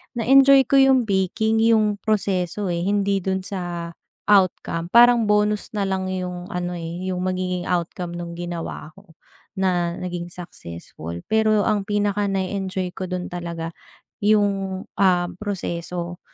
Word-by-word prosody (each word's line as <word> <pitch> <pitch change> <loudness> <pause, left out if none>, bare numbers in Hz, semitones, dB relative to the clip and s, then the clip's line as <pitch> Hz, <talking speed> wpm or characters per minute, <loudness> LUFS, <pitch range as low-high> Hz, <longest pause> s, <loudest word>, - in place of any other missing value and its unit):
na 230 - -1
enjoy 275 +1 +7
ko - - +2
yung 265 -2 +5
baking 210 +3 +1
yung 215 -2 +3
proseso, 200 -2 -1
eh. 170 0 -1
Hindi 200 0 +1
dun 190 0 -2
sa 175 -3 -5 0.4
outcome. 185 -4 +2
Parang 240 0 +7
bonus 210 0 +2
na 205 - 0
lang 190 -1 -1
yung 180 -1 -4
ano, 180 -1 -3
eh, 170 +3 -5
yung 180 - -3
magiging 185 -1 -2
outcome 175 0 -2
nung 170 -1 -6
ginawa 170 -2 -5
ko, 195 -5 -19 0.4
na 175 -2 +1
naging 175 -1 -4
successful. 85 - -8
Pero 215 -1 +3
ang 210 -3 +1
pinaka 205 0 0
na 195 -1 0
enjoy 190 -1 -3
ko 185 - -4
dun 180 0 -4
talaga, 170 -2 -5 0.5
yung, 200 -2 +1 0.2
ah, 180 -2 +3
proseso. 175 -3 -4
185 Hz, 145 wpm, -22 LUFS, 175-205 Hz, 0.5 s, enjoy